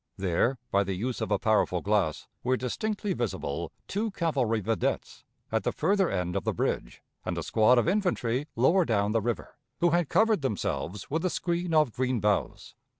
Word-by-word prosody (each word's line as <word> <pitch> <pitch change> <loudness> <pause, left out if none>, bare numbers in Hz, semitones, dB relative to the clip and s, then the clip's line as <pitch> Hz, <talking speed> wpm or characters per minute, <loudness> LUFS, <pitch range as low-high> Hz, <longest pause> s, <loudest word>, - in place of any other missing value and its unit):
There, 100 +7 +1
by 100 0 +3
the 95 -1 -3
use 120 +6 -3
of 110 - -2
a 105 - +3
powerful 100 -4 +2
glass, 100 -6 0 0.2
were 130 +1 +2
distinctly 205 - -2
visible 120 - -3 0.2
two 215 +3 -1
cavalry 140 - 0
videttes 110 +1 -2 0.3
at - - +1
the - - 0
further 195 -2 +2
end 90 -2 -2
of - - -1
the - - 0
bridge, - - -2 0.2
and - - -3
a - - -2
squad 115 +3 +4
of 120 - +3
infantry 155 - 0
lower 160 +11 +4
down 105 -7 +1
the 115 0 +2
river, 115 -1 -4 0.2
who 175 -1 +3
had 175 -2 +2
covered 220 -5 +3
themselves 100 - -3
with 160 +2 0
a 185 - +2
screen 170 -1 -1
of 150 -7 +4
green 130 -1 0
boughs. 105 0 -1
120 Hz, 185 wpm, -28 LUFS, 105-170 Hz, 0.3 s, squad